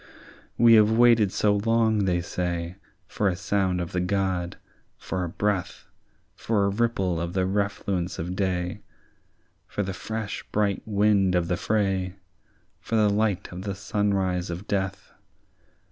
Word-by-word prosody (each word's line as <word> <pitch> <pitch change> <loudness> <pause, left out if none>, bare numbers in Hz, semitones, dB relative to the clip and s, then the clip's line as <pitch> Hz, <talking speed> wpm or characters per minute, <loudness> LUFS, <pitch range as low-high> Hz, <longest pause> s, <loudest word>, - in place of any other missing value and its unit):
"We 115 0 +7
have 110 -1 +7
waited 115 -3 +5
so 105 0 +2
long," 110 -1 +2
they 90 -2 +1
say, 85 0 -3 0.3
"For 105 - -1
a 90 - -1
sound 95 -1 0
of 85 -1 -4
the 90 - -1
God, 90 -2 -1 0.4
for 95 -1 -3
a 85 - -3
breath, 100 0 -2 0.5
For 105 -3 0
a - - +2
ripple 100 -5 0
of 85 0 -4
the 95 -1 +1
refluence 100 -2 -1
of 90 +3 -4
day, 95 0 -2 0.9
For 105 - -2
the 95 0 -4
fresh 110 +4 -5
bright 100 -2 +1
wind 100 -3 +3
of 85 -1 +1
the 90 - +2
fray, 95 -3 0 0.6
For 115 - -3
the 105 -2 +4
light 105 -2 0
of 90 +1 -7
the 100 0 -4
sunrise 95 -3 -1
of 85 +4 -5
death. 95 -1 -3
95 Hz, 150 wpm, -26 LUFS, 90-105 Hz, 0.9 s, We